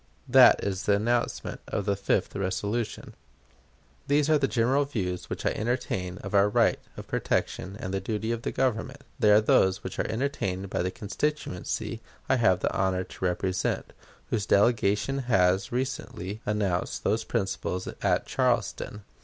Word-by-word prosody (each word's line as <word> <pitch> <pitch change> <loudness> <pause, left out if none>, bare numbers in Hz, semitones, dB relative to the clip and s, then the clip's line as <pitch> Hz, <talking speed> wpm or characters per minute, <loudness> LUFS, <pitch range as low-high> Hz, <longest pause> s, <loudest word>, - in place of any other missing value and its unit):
That - - +7
is 100 0 -2
the 100 - +5
announcement 120 +3 -1
of 100 - -2
the 100 - +1
fifth 100 0 0
resolution. 100 +4 -2 0.9
These 145 +1 +3
are 155 - +5
the 135 - +2
general 130 +4 +2
views 95 -10 -3
which - - -5
I - - +3
entertain 95 -6 -2
of 100 - -6
our 100 0 +5
right - - +3 0.2
of - - -8
protection 95 +2 -2
and 95 - -4
the 95 - 0
duty 110 +2 -2
of 115 -1 -2
the - - -3
Government. 130 +2 -1 0.2
They 110 -4 +4
are 105 0 +7
those 95 -2 +3
which - - -6
are - - 0
entertained 100 -7 -2
by - - 0
the 90 - 0
constituency 105 0 -3 0.3
I 135 - +3
have 95 -6 +3
the - - 0
honor 95 -1 +1
to 95 - -6
represent, 90 +1 -1 0.4
whose 105 -2 0
delegation 105 +4 +2
has 95 -2 +3
recently 115 -5 -4
announced 100 -4 -1
those 110 +2 +1
principles 95 -4 -2
at - - +1
Charleston. 105 -1 -1
105 Hz, 160 wpm, -27 LUFS, 95-120 Hz, 0.9 s, That